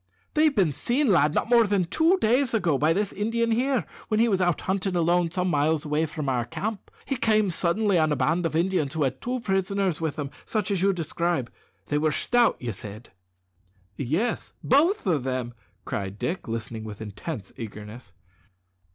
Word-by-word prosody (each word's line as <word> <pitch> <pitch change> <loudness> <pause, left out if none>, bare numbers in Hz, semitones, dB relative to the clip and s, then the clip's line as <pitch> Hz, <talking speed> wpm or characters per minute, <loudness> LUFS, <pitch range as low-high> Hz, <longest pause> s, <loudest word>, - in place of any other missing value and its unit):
"They've 305 -1 +3
been 185 -7 +3
seen, 245 - +1
lad, 155 -4 +3
not - - +1
more 235 -2 +5
than 200 -3 +1
two 320 - +3
days 245 -1 +2
ago, 175 -9 +2
by 155 +2 +3
this 200 +3 0
Indian 230 +3 0
here, 255 +1 +1 0.2
when 215 -1 +1
he 235 - +4
was 195 -4 +1
out 175 -2 +1
hunting 190 0 -1
alone 175 0 +2
some 180 +2 -1
miles 155 -1 +1
away 150 +2 0
from 150 -1 -5
our 125 -2 +1
camp. 200 - -5 0.2
He 270 - -1
came 215 -5 +2
suddenly 185 +2 +1
on 155 -1 +2
a - - +2
band 160 +6 +1
of 160 - -6
Indians 165 -4 +1
who 155 - +1
had 130 -1 -2
two 250 0 -2
prisoners 190 -4 0
with 160 -3 -1
them, 145 -2 -4
such 210 -3 -2
as 190 -3 0
you 195 +1 +4
describe. 170 -6 -2 0.3
They 150 - 0
were 155 0 +2
stout, 240 +9 +2
said 105 +2 -10 0.9
you?" 140 - -4
"Yes, 205 - -1
both 325 - +3
of 160 -9 +1
them," 130 -2 -3 0.3
cried 100 0 -4
Dick, 175 - -3
listening 115 -1 -4
with 105 -2 -8
intense 110 - -7
eagerness. 105 -1 -9
175 Hz, 185 wpm, -26 LUFS, 145-215 Hz, 0.9 s, more